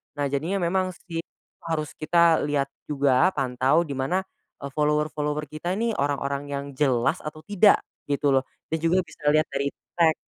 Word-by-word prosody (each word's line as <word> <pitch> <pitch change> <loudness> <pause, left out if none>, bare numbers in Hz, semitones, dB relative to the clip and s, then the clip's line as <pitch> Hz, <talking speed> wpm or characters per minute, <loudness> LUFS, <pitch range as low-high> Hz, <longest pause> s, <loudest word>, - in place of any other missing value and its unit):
Nah 145 - -1
jadinya 155 +7 -1
memang 185 +1 0
sih, 170 -2 -6 0.5
harus 155 -2 -2
kita 165 +1 +4
lihat 140 -2 0 0.2
juga 140 0 +3
pantau 135 +4 +2
di - - -6
mana, 170 +9 0 0.4
eee, 140 - -5
follower-follower 150 0 0
kita 175 +4 -3
nih 230 +1 +1
orang-orang 140 0 -1
yang 140 0 -3
jelas 130 +3 +2
atau 155 +1 -8
tidak 205 0 +5 0.3
gitu 145 0 +1
loh, - - -7 0.3
dan 160 - 0
juga 175 +3 +3
bisa - - -17
dilihat 155 +1 +4
dari 140 0 -1 0.3
tag 160 -2 +5
150 Hz, 165 wpm, -25 LUFS, 140-170 Hz, 0.5 s, tidak